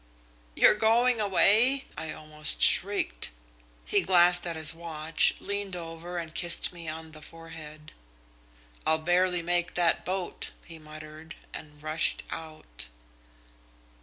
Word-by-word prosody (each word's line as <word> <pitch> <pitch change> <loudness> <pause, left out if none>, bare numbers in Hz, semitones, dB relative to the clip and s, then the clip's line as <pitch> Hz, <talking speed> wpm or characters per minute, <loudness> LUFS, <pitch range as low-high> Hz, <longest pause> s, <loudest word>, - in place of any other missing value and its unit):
"'You're - - +6
going 225 +2 +2
away?' 220 +7 +2
I 155 - -5
almost 155 0 -2
shrieked. 185 - +3 0.6
"He - - +1
glanced 175 -1 +4
at 170 - -4
his 160 0 +4
watch, 160 -1 +1
leaned 200 -2 -4
over, 170 +1 -8
and 165 -2 -6
kissed 175 +1 0
me 170 -2 -10
on 160 0 -8
the 155 -1 -13
forehead. 155 -2 -12 0.9
"'I'll 160 - +2
barely 175 +2 0
make 175 0 -1
that 175 -2 +1
boat,' 185 0 -4 0.2
he 165 -1 -11
muttered, 155 +1 -12 0.2
and 150 -1 -12
rushed 155 +1 +2
out."... 155 - -8
165 Hz, 125 wpm, -27 LUFS, 155-180 Hz, 0.9 s, You're